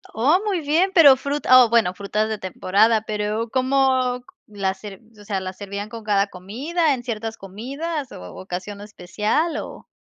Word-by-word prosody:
Oh, 285 - +3
muy 385 -5 0
bien, 325 +6 +2
pero 295 -7 +8
fruta 265 -2 +4
o, - - -4
bueno, 210 -6 +3
frutas 210 +2 -2
de 220 - -2
temporada, 205 +4 +2
pero, 215 +1 -3
¿cómo 260 -1 +1 0.2
la 200 -2 -2
ser 200 -2 -10 0.2
o - - -13
sea, 200 -2 -2
las 185 0 -7
servían 200 +1 -6
con 230 -1 -9
cada 200 -1 +2
comida, 275 - -1
en 245 -2 -5
ciertas 225 -2 -4
comidas, 270 - -6
o - - -10
ocasión 185 +2 -7
especial, 210 - -2
o? - - -8
220 Hz, 170 wpm, -22 LUFS, 200-270 Hz, 0.2 s, pero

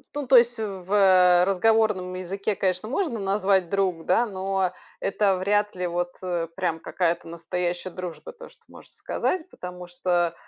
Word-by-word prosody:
Ну, 290 -1 -3
то 260 - +4
есть 240 0 +4
в, 195 -4 -6
э, 185 -3 +6
разговорном 195 -1 +2
языке, 195 +3 -3
конечно, 185 +2 -1
можно 275 - -1
назвать 195 -2 +1
"друг", 185 -4 -1
да, 240 - +3
но 190 -2 -1 0.3
это 195 -1 +1
вряд 205 +2 0
ли 180 0 -3
вот, 175 0 -2
э, 175 -2 -2
прям 165 -3 -1
какая-то 170 0 -1
настоящая 175 +2 -3
дружба, 170 -4 -7
то, - - -13
что - - -25
можно - - -15
сказать, 365 -2 -2
потому 180 0 -8
что, 175 -1 0
185 Hz, 160 wpm, -25 LUFS, 175-205 Hz, 0.3 s, э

